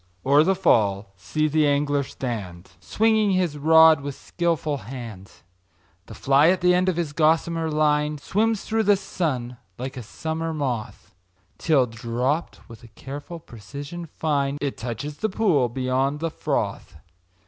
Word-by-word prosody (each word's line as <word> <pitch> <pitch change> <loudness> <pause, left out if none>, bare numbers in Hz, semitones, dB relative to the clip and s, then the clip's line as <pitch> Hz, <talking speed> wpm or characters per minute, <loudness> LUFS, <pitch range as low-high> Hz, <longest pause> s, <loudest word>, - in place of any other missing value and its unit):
o'er 140 +3 +5
the 190 +4 +2
fall 100 - +1
see 95 +12 -1
the 155 0 +2
angler 145 0 +1
stand, 105 -10 -6
Swinging 220 -1 +2
his 180 -5 0
rod 160 0 +6
with 140 -1 -5
skilful 165 -4 -2
hand; 115 -7 -9 0.8
The - - -10
fly 140 +4 +4
at 185 0 +1
the 180 0 +4
end 180 +1 +2
of 185 - 0
his 165 -4 -3
gossamer 165 +1 +1
line 150 0 +1
Swims 215 +8 0
through 225 0 0
the 205 -2 +4
sun 135 -11 -3 0.2
like 130 +2 -6
a - - -4
summer 160 +7 -4
moth, 125 -7 -4 0.5
Till, 150 -6 +3
dropt 120 +6 -3
with 115 -2 -13
a - - -12
careful 140 +8 -9
precision 140 - -9
fine, 140 -3 -1
It 140 -2 -3
touches 125 +6 -6
the 220 - -1
pool 180 - +2
beyond 130 +3 -1
the 165 +1 -2
froth. - - -3
145 Hz, 150 wpm, -24 LUFS, 125-165 Hz, 0.8 s, rod